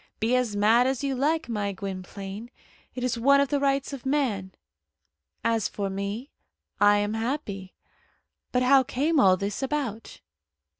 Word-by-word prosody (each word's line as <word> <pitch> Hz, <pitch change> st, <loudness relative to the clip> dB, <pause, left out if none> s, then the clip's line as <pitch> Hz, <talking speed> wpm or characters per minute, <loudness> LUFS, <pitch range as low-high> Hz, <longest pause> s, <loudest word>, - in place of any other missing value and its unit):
Be 230 Hz, +3 st, +2 dB
as 245 Hz, -5 st, 0 dB
mad 225 Hz, +5 st, +4 dB
as 265 Hz, +1 st, -1 dB
you 275 Hz, -1 st, 0 dB
like, 300 Hz, +4 st, 0 dB
my 205 Hz, -4 st, -2 dB
Gwynplaine. 195 Hz, +3 st, -7 dB, 0.5 s
It 250 Hz, -, -4 dB
is 245 Hz, -2 st, -1 dB
one 280 Hz, +4 st, +5 dB
of 280 Hz, -1 st, +2 dB
the 285 Hz, -, +1 dB
rights 275 Hz, 0 st, 0 dB
of 270 Hz, -, -7 dB
man. 255 Hz, -9 st, -1 dB, 0.9 s
As 225 Hz, -2 st, +1 dB
for 200 Hz, -1 st, -4 dB
me, 200 Hz, +7 st, -4 dB, 0.5 s
I 205 Hz, 0 st, +6 dB
am 205 Hz, +1 st, -1 dB
happy. 220 Hz, -5 st, -4 dB, 0.8 s
But 250 Hz, 0 st, +2 dB
how 270 Hz, +1 st, +6 dB
came 280 Hz, +4 st, 0 dB
all 185 Hz, -6 st, +5 dB
this 200 Hz, +4 st, -3 dB
about?" 265 Hz, -6 st, -3 dB
235 Hz, 155 wpm, -26 LUFS, 205-275 Hz, 0.9 s, I